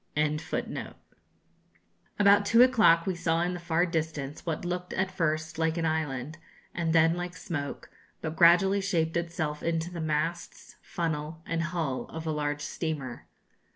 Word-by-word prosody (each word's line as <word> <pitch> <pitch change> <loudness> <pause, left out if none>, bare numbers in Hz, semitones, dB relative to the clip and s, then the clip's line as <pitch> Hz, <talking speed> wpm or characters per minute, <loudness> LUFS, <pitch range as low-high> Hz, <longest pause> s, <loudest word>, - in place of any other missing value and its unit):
] - - -14 2.0
About 205 0 +6
two 230 +4 +6
o'clock 215 -10 +5
we 190 - 0
saw 165 -1 0
in 180 +1 -1
the 175 - -5
far 170 0 +1
distance 155 -4 -3
what 165 +2 -2
looked 180 0 -3
at 190 0 -1
first 155 -2 -1
like 160 +1 +1
an 165 - 0
island, 155 -2 -2 0.3
and 165 -2 -1
then 165 0 +5
like 175 0 -4
smoke, 145 -4 -5 0.3
but 160 0 -4
gradually 185 +4 +5
shaped 165 -5 0
itself 165 -3 -2
into 165 +1 -1
the 170 -2 -5
masts, 160 +2 -3
funnel, 160 -1 -3
and 165 0 -1
hull 160 -5 -2
of 160 0 -8
a 160 - -1
large 150 -1 -2
steamer. 145 -4 -4
165 Hz, 155 wpm, -28 LUFS, 155-175 Hz, 2.0 s, About